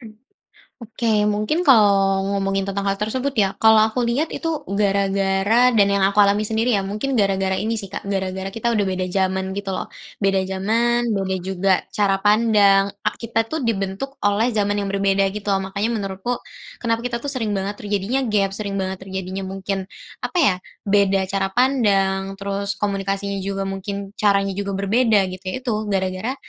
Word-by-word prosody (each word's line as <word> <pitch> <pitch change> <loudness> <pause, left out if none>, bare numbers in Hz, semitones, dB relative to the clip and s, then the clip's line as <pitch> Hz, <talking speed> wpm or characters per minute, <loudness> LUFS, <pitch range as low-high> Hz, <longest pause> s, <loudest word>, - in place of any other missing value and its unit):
Mmm, 225 -3 -12 0.7
oke, 230 +1 -5 0.3
mungkin 215 +10 0
kalau 200 - +5
ngomongin 195 0 -1
tentang 200 0 -2
hal 195 - -2
tersebut 255 +6 -1
ya, 195 -2 +2
kalau 220 0 +7
aku 225 +3 -2
lihat 240 +7 +1
itu, 330 - -2 0.2
gara-gara 200 +3 +2
dan 215 -5 +4
yang 200 - +1
aku 195 +2 +2
alami 205 0 +5
sendiri 225 +3 0
ya, 200 - +1
mungkin 210 +8 -3
gara-gara 195 -3 +1
ini 220 +3 -1
sih 200 - -4
Kak, 195 - -7
gara-gara 190 0 -2
kita 230 +3 -1
udah 210 - +2
beda 185 0 -2
zaman 190 0 -1
gitu 200 0 -4
loh. 190 - -3 0.3
Beda 195 -1 +2
zaman, 230 +4 +1
beda 190 -1 -1
juga 190 +1 0 0.2
cara 195 -2 +2
pandang, 205 -1 +4 0.2
ak - - +1
kita 225 0 0
tuh 315 +5 -3
dibentuk 230 +4 -3
oleh 210 +4 +2
zaman 205 -2 0
yang 200 - -3
berbeda 195 0 +1
gitu 210 +1 -7
loh. 195 0 -2
Makanya 200 +3 -1
menurutku, 200 +3 -3 0.4
kenapa 230 -1 0
kita 235 -1 -3
tuh 285 - -2
sering 225 -6 -1
banget 200 +1 -3
terjadinya 205 +4 -1
gep, 205 -3 +1
sering 200 0 -4
banget 190 -1 -2
terjadinya 190 0 -5
mungkin, 195 +1 -3 0.4
apa 360 - -3
ya, 205 -10 +4 0.3
beda 195 -1 +2
cara 195 0 0
pandang, 195 -7 +2
terus 200 0 -3
komunikasinya 195 0 -2
juga 195 0 -3
mungkin, 195 +1 -5
caranya 200 -1 +2
juga 200 -1 -2
berbeda 210 +2 +3
gitu 185 0 -9
ya 185 - -3
itu, 250 - -2 0.2
gara-gara 190 +4 -1
200 Hz, 175 wpm, -21 LUFS, 195-220 Hz, 0.7 s, kalau